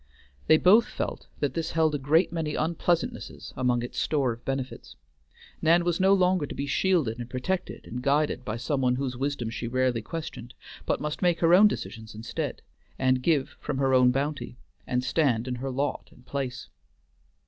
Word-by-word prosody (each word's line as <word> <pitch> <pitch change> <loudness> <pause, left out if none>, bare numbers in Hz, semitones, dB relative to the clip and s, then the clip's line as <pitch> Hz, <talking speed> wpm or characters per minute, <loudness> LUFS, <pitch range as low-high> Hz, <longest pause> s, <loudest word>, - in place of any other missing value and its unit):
They 155 - +7
both 210 +8 +6
felt - - -5
that 145 -3 0
this 165 +2 -3
held 160 -2 +2
a 145 - -1
great 160 +6 +3
many 160 -3 -2
unpleasantnesses 170 +1 -2
among 125 -2 +1
its 120 - -5
store 140 -5 +1
of 115 - -14
benefits. 135 -1 -4 0.7
Nan 170 +2 +4
was 175 -1 0
no 190 +1 +4
longer 185 -5 +3
to - - -7
be 140 - -2
shielded 140 -5 +1
and 120 0 -6
protected 175 +10 -3
and 125 +2 -6
guided 145 0 +1
by 110 -1 -3
some 135 +3 -1
one 125 -1 +2
whose 130 -1 -3
wisdom 130 -3 -2
she 120 - -4
rarely 130 -1 +1
questioned, 120 -2 -7 0.3
but - - 0
must 150 0 -3
make 175 -2 +2
her 165 0 +5
own 200 +4 +8
decisions 110 - -5
instead, 110 +1 -4 0.3
and 130 -1 +2
give 145 -1 +2
from 145 - -3
her 135 -1 +2
own 125 -1 +6
bounty, 140 -1 -2 0.3
and 125 0 0
stand 130 -4 +1
in 125 - -2
her 130 +2 -4
lot 140 +3 -2
and 125 - -20
place. 130 -1 -4
140 Hz, 185 wpm, -27 LUFS, 125-160 Hz, 0.7 s, own